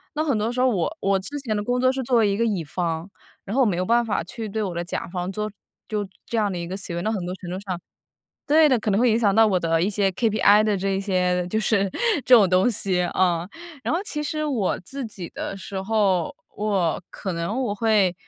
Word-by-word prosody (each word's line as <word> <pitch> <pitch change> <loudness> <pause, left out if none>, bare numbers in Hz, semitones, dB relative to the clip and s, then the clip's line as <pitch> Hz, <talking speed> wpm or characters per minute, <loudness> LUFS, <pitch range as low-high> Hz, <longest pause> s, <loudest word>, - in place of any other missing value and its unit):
那 305 - +1
很 285 -5 +1
多 215 +2 0
时 245 - -4
候 255 - +4
我 240 - -1
我 195 0 +1
之 285 +10 -4
前 225 -6 -2
的 205 - -1
工 245 +3 0
作 255 +1 +4
是 265 0 -3
作 245 0 +2
为 220 -2 +4
一 200 - +1
个 230 - +1
乙 200 -7 -1
方， 165 +2 -3 0.4
然 200 - -6
后 270 - +3
我 - - +5
没 185 -4 0
有 180 - 0
办 235 +3 +3
法 220 -7 -1
去 215 +5 -7
对 215 +2 -2
我 190 -3 -3
的 170 0 -3
甲 175 - -4
方 180 +1 -4
做 210 +2 -3 0.4
就 210 -2 -2 0.2
这 235 - -3
样 205 -2 +1
的 180 - -4
一 170 0 -4
个 185 - -4
行 190 -3 -5
为， 170 - -2
那 220 - 0
很 200 -5 -2
多 180 +1 -4
程 185 - -10
度 185 - -3
上 190 -3 -5 0.7
对 310 +1 +5
的， 260 -4 +3
可 215 -1 -1
能 200 - +2
会 245 0 +4
影 220 - +3
响 210 -4 +2
到 220 +2 +6
我 195 -3 +2
的 165 -2 +1
一 185 - +2
些 200 -2 +1
KPI 210 0 +4
的 210 -1 +2
这 195 +1 -1
一 - - -1
些 180 -2 0
就 220 +4 -1
是 200 -3 +2 0.4
这 255 - +8
种 205 -5 +5
东 185 +5 +4
西 195 -5 0
啊。 175 -1 +1 0.4
然 - - 0
后 350 - -1
其 300 -7 -4
实 305 +1 -2
我 250 -11 0
自 270 +8 -6
己 190 -6 -8
的 - - -5
时 190 0 -6
候， 195 -4 +1 0.2
我 195 -7 0
可 190 - -5
能 170 +6 -3
我 215 -5 -1
会 210 -4 +3
200 Hz, 290 characters per minute, -24 LUFS, 185-225 Hz, 0.7 s, 这